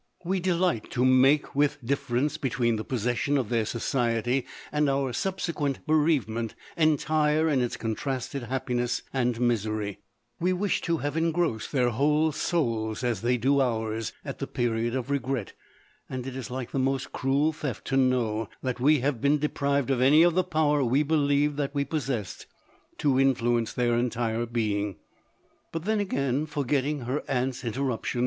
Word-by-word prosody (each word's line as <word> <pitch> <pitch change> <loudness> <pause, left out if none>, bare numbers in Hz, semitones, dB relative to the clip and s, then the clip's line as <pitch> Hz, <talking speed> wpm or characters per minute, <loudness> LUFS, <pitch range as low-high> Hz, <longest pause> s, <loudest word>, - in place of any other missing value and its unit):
We 190 +2 0
delight 175 - 0
to 125 0 +2
make 130 +3 +5
the 145 +1 +4 0.2
dift'e 140 +1 -2
rence 140 +6 0
between 120 -4 +1
the 110 - -3
possession 125 +4 0
of 125 -6 -1
their 115 -2 +1
society, 120 +2 0 0.2
and 150 -1 +2
our 135 -2 0
subsequent 165 -7 -2
bereavement, 140 -8 +1 0.2
entire 155 0 +2
in 140 -5 +2
its 120 - -2
contrasted 130 +4 -3
happiness 125 -1 -1
and 125 -3 0
misery; 110 -4 -1 0.4
we 180 +2 +2
wish 195 +2 0
to 170 -1 0
have 145 -1 -3
engrossed 165 -7 0
their 125 -4 +2
whole 150 +6 +2
souls, 115 -9 -1
as 120 -5 0
they 125 +2 +2
do 135 +4 +3
ours, 110 -4 -1
at - - -6
the - - -3
period 120 0 -1
of 130 +1 -3
regret, 130 -5 -2 0.6
and 130 -1 -4
it 130 -1 -6
is 130 -1 -5
like 125 -1 -5
the 135 - -1
most 135 0 -1
cruel 140 +4 +1
theft, 145 -7 -5
to 135 - -1
know 120 -5 +1
that 125 -2 -2
we 145 +2 +4
have 135 -3 -1
been 140 +2 +3
de 150 +1 -1
prived 140 -1 0
of 130 -2 +1
any 145 +5 +6
of 175 -1 +4
the 185 +2 +2
power 155 -4 +2
we 130 +4 +2
believed 145 -1 +2
that 145 0 -2
we 140 0 +1
possessed, 135 - -3 0.5
to 135 -3 +2
influence 120 -4 +2
their 120 -1 +1
entire 120 -1 -1
being. 105 -4 -1 0.8
But 165 +1 -4
then 215 0 +1
again, 140 -6 0
forgetting 145 0 -1
her 130 +5 -2
aunt's 130 0 -1
interruption. 125 0 -2
135 Hz, 170 wpm, -27 LUFS, 120-150 Hz, 0.8 s, any